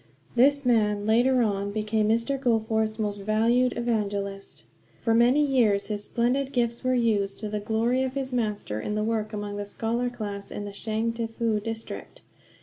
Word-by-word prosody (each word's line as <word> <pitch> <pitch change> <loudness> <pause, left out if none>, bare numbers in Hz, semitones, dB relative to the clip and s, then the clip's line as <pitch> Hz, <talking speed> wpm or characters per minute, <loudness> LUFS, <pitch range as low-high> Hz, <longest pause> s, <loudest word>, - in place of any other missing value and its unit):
This 280 +3 +4
man, 210 -4 +2
later 245 +3 +4
on, 200 -2 -1
became 215 0 0
Mr. 230 +5 +1
Goforth's 220 -3 +1
most 205 -2 -2
valued 230 +5 +2
evangelist. 200 -4 -2 0.4
For 225 - +2
many 245 +6 +4
years 225 -8 +2
his 205 -1 -3
splendid 260 +3 0
gifts 235 -1 0
were 255 0 +2
used 210 -5 +1
to 215 - -3
the 210 0 -2
glory 225 +4 +1
of 260 0 -2
his 265 -1 -3
Master 210 - -2
in 210 - -3
the 210 - 0
work 215 -1 -1
among 205 -1 -4
the 205 - -3
scholar 235 +4 -1
class 205 -4 -6
in 205 - -5
the 205 - -6
Changtefu 225 +1 -1
district. 225 0 -6
225 Hz, 165 wpm, -26 LUFS, 210-240 Hz, 0.4 s, This